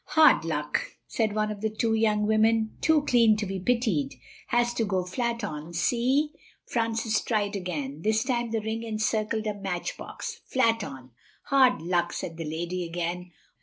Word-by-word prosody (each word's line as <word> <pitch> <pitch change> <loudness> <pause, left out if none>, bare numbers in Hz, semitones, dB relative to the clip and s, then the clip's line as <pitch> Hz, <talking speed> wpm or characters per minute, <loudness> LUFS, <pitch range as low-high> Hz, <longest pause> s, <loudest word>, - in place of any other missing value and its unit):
"Hard 315 -1 +7
luck," - - -2
said 215 -2 -1
one 215 0 +1
of 205 -1 -7
the 220 - +1
two 220 +1 0
young 215 -1 +2
women, 220 +1 +2
too 315 -2 +4
clean 230 -5 +4
to 210 - -2
be 190 0 -3
pitied. 190 - 0 0.3
"Has 240 0 +2
to 230 - 0
go 190 -4 0
flat 235 +4 -2
on—see?" 235 - 0 0.3
Francis 225 -2 0
tried 210 -2 0
again. 155 -6 -4
This 220 +3 +2
time 240 -2 -1
the 225 -1 -1
ring 220 +1 -3
encircled 220 0 -1
a 210 - 0
matchbox, 195 -3 -5
"flat 230 -4 +2
on." 130 -6 -9 0.3
"Hard 260 - +4
luck," 175 0 0
said 165 - -5
the 165 - -4
lady 175 +3 -3
again. 175 +1 -4
215 Hz, 165 wpm, -27 LUFS, 180-230 Hz, 0.3 s, Hard